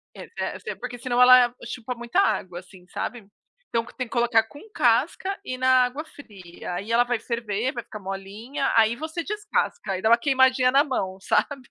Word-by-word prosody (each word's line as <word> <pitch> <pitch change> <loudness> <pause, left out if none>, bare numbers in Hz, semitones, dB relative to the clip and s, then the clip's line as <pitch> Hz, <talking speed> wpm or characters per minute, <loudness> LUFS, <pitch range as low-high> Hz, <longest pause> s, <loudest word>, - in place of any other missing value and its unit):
eh - - -10
eh, - - -4
porque 245 - -7
se 250 +1 -7
não 245 +1 +3
ela 250 -1 +7
chupa 250 +1 -5
muita 240 +10 -1
água, 180 - -1
assim, 180 -1 -17
sabe. 220 +2 -5 0.4
Então 230 0 0
tem 255 - -2
que - - -25
colocar 235 -2 +3
com 285 +6 -14
casca 275 - +1
e 255 -6 -5
na 255 0 +4
água 285 +6 -5
fria. 190 - -10
Aí 205 +5 -5
ela 240 +1 +5
vai 245 -2 -2
ferver, 230 +1 -2
vai 235 - -5
ficar 215 - -9
molinha. 200 +9 -4
Aí 225 +1 +4
você 320 +4 -5
descasca, 415 - -2
aí 185 - -3
dá 220 - +2
uma 235 - +7
queimadinha 260 -1 +3
na 280 +2 +5
mão, 190 -10 -3
sabe. 265 +5 -1
240 Hz, 195 wpm, -24 LUFS, 220-260 Hz, 0.4 s, ela